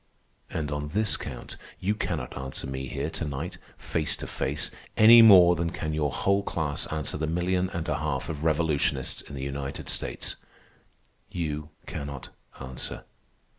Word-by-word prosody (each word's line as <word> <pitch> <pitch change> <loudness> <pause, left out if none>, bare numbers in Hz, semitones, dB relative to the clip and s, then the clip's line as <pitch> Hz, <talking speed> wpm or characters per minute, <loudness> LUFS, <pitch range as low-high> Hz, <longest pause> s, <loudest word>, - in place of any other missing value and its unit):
And 75 -3 -3
on 75 0 -2
this 105 +7 +1
count - - -7 0.2
you 100 +3 +1
cannot 105 - -3
answer 65 0 -4
me 65 0 -4
here 70 +3 -3
to - - -3
night, 75 +4 -4 0.2
face 80 -2 -1
to - - -7
face, - - -1 0.3
any 115 +2 +10
more 90 -5 +9
than 85 0 -1
can 80 -1 -3
your 75 -1 +1
whole 100 +6 +2
class 80 -7 -2
answer 75 -1 -2
the 80 - 0
million 90 +3 +1
and 85 -4 -4
a 75 0 0
half 75 -4 -2
of 80 -2 -4
revolutionists 75 -4 +1
in - - -10
the 65 - -5
United 70 0 -4
States. - - -2 0.9
You 75 -3 -3 0.2
cannot 70 -2 -6 0.3
answer. 65 -1 -6
75 Hz, 160 wpm, -27 LUFS, 70-85 Hz, 0.9 s, any